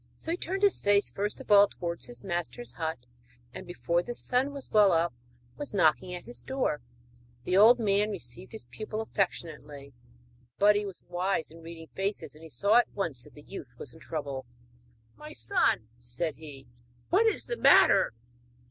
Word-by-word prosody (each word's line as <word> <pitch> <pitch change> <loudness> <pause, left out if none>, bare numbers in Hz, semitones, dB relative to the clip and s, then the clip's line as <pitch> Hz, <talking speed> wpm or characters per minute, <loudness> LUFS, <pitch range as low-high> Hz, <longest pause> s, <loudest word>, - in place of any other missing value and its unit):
So 325 - -5
he 345 - -1
turned 385 +3 -3
his 405 - +4
face 205 0 +2
first 205 +1 -3
of - - -8
all 205 0 +8
towards 170 -3 -4
his 245 - -7
master's 175 +6 -3
hut, 160 -3 -3 0.6
and - - -8
before 175 -1 0
the 240 +6 -6
sun 255 +4 0
was 280 -2 -8
well 210 -3 +6
up 165 -3 +2 0.4
was 290 -7 -4
knocking 180 +1 +3
at 175 - -8
his 240 - -5
door. 265 - -1 0.6
The 180 - 0
old 220 +5 +8
man 205 -1 +2
received 180 - -5
his 220 - -8
pupil 215 0 -5
affectionately; 150 -9 -4 0.6
but 205 +1 +5
he 205 0 0
was 195 - -10
wise 175 -1 -1
in 165 +1 -13
reading 165 -1 -10
faces, 195 +2 -3
and 160 +1 -13
saw 205 +8 +3
at 240 - +4
once 155 -11 -3
that 150 - -17
the 150 - -13
youth 125 -4 -9
was - - -5
in 160 - -15
trouble. 140 -6 -5 0.7
'My 150 +7 -10
son,' 110 -1 +1
said 120 +7 -3
he, 145 -4 -11 0.5
'what 430 +5 +5
is 440 - +1
the 480 - -3
matter?' 115 - +6
180 Hz, 180 wpm, -29 LUFS, 155-215 Hz, 0.7 s, all